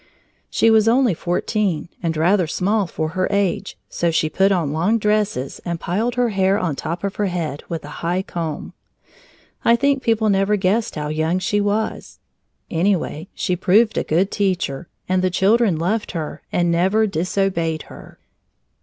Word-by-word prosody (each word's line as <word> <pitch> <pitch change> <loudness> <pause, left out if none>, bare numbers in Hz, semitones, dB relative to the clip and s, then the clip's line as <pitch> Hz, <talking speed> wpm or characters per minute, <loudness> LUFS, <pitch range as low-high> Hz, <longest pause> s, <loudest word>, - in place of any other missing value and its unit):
She 225 - +3
was 220 0 +4
only 240 -2 +4
fourteen 175 0 -1
and 165 -3 -1
rather 175 +2 +3
small 200 +4 0
for 155 -1 -3
her 185 +2 -1
age, 200 -1 -1
so 170 - -1
she 155 -1 0
put 195 +1 +3
on 165 -7 0
long 180 +9 +2
dresses 210 - -1
and 170 -1 -3
piled 220 +9 -1
her 245 -1 +2
hair 195 -1 +2
on 175 -8 -1
top 170 +5 -4
of 200 -1 -3
her 205 - +1
head 165 -6 -3
with 165 -3 -4
a 150 - -9
high 175 +3 0
comb. 165 -5 -5 0.9
I 235 - +5
think 275 +2 +1
people 220 -3 +2
never 195 +2 +2
guessed 205 +4 0
how 150 -1 -3
young 160 +3 0
she 205 +3 0
was. 205 +2 -2 0.5
Anyway, 175 -2 0
she 180 - -1
proved 205 +4 +3
a - - 0
good 180 +6 +1
teacher, 180 -6 -1 0.2
and 185 0 +1
the 185 - +2
children 200 0 +3
loved 205 +7 -1
her 160 -4 -5
and 175 -1 +1
never 190 +6 +3
disobeyed 170 -3 -1
her. - - -13
185 Hz, 170 wpm, -21 LUFS, 165-210 Hz, 0.9 s, I